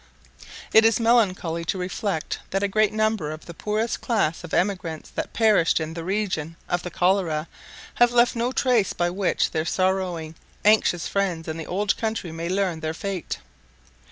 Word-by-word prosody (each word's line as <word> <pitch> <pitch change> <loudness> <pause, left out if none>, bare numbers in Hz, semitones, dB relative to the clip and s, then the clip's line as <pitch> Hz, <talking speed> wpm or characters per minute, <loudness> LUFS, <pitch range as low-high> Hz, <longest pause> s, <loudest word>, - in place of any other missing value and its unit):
It 220 - +8
is 225 0 +4
melancholy 195 -8 +2
to 190 - -1
reflect 185 -1 -3
that 195 +1 -1
a - - +3
great 215 +1 +2
number 215 -7 0
of 155 +1 -7
the 170 - -9
poorest 215 +6 -2
class 185 -9 0
of 175 - -9
emigrants 180 -4 -1
that - - -4
perished 215 -9 +3
in 160 0 -4
the 165 0 -6
reign 185 -4 -2
of 175 - 0
the 180 - -5
cholera 175 -3 +1 0.5
have 240 0 +4
left 240 0 +4
no 235 +2 0
trace 250 -6 +2
by 175 0 0
which 190 +1 0
their 155 -2 0
sorrowing 180 -2 -1 0.3
anxious 210 -5 +4
friends 185 -5 -1
in 160 0 -4
the 160 - -6
old 195 +2 0
country 220 -6 -3
may 165 +1 -4
learn 185 -3 0
their 160 0 -3
fate. 195 -1 -4
185 Hz, 175 wpm, -24 LUFS, 165-215 Hz, 0.5 s, It